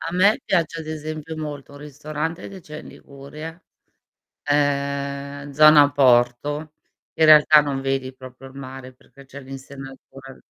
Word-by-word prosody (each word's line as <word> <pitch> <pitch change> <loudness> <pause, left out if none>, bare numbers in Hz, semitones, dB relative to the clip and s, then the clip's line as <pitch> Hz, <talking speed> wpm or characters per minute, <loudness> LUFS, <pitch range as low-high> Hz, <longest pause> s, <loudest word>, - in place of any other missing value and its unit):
A 165 +1 -5
me 200 +4 +3
piace 165 -2 -1
ad 160 - -10
esempio 155 0 -6
molto 145 -3 -7
un 145 - -12
ristorante 150 +3 -6
che 195 -1 -11
c'è 150 -1 -10
in - - -13
Liguria, 150 +5 -11 0.8
ehm, 140 0 -2
zona 150 0 +6
porto, 140 +3 +1 0.4
in 160 - +3
realtà 155 0 +7
non 140 -2 -3
vedi 135 -1 -3
proprio 130 0 -13
il 130 - -18
mare 130 -1 -10
perché 135 +2 -20
c'è 135 +1 -12
l'insenatura 135 0 -12
145 Hz, 145 wpm, -22 LUFS, 135-155 Hz, 0.8 s, realtà